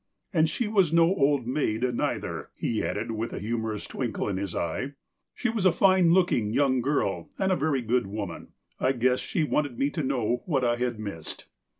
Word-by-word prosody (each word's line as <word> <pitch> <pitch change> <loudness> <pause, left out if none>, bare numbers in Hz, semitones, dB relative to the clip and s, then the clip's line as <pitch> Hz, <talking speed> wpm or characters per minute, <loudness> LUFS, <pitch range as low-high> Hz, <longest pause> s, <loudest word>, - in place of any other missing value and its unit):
" - - -48
And 160 -2 +3
she 220 +8 -1
was 195 -6 +3
no 165 0 +5
old 145 -7 +2
maid, 125 -3 -1
neither," - - -2
he 110 - -1
added - - -2
with 115 +1 -3
a - - -4
humorous 110 -1 -3
twinkle - - -3
in 100 -2 -1
his 95 -2 -4
eye. 110 - -2 0.4
"She - - -1
was 225 -4 -1
a 185 - +6
fine 185 -1 +4
look 180 0 +4
ing 105 -3 +1
young 130 +2 +2
girl, 100 - -1
and 190 0 +1
a - - +4
very 140 -4 0
good 120 -1 +1
woman. 100 -4 -6 0.3
I 130 - +2
guess 125 0 +2
she 165 - -1
wanted 145 -4 0
me 140 +1 +1
to 155 - -2
know 125 -3 0
what 135 -7 +1
I 120 0 +2
had 125 -1 -1
missed." 100 -7 -6
130 Hz, 210 wpm, -27 LUFS, 110-160 Hz, 0.4 s, a